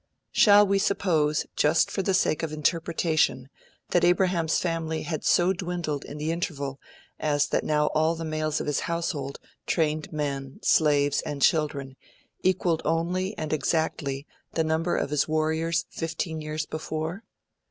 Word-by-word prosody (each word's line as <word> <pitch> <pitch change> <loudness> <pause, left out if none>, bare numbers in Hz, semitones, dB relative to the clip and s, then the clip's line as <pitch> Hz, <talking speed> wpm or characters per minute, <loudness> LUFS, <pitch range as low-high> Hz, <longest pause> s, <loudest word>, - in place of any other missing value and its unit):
Shall 205 -1 +7
we 200 0 +2
suppose 160 -7 +1
(just 155 +2 +3
for 195 - -1
the 190 0 +1
sake 155 - +1
of 165 - -2
the 155 - -6
interpretation) 155 -4 0 0.4
that 175 - +3
Abraham's 175 -2 +2
family 165 -2 -2
had 155 -3 -4
so 180 +2 +4
dwindled 175 -5 -3
in 145 - -8
the 155 +2 -1
interval 140 -5 -3 0.4
as 145 -1 +2
that - - +1
now 150 -1 +2
all 155 +2 +2
the 165 0 -5
males 155 -1 -1
of - - -3
his 150 -2 0
household, 165 -5 -3 0.3
trained 155 -2 0
men, 140 -3 -3
slaves, 145 -2 +3
and 145 -3 -5
children, 140 -4 +1 0.4
equalled 180 -3 +1
only 180 +4 -1
and 155 0 -3
exactly 145 -3 -1 0.3
the 160 - +1
number 160 +2 0
of 140 - -2
his 150 - +1
warriors 160 +1 0
fifteen 165 -1 -3
years 155 0 -3
before?' 160 +6 -4
160 Hz, 150 wpm, -26 LUFS, 150-170 Hz, 0.4 s, Shall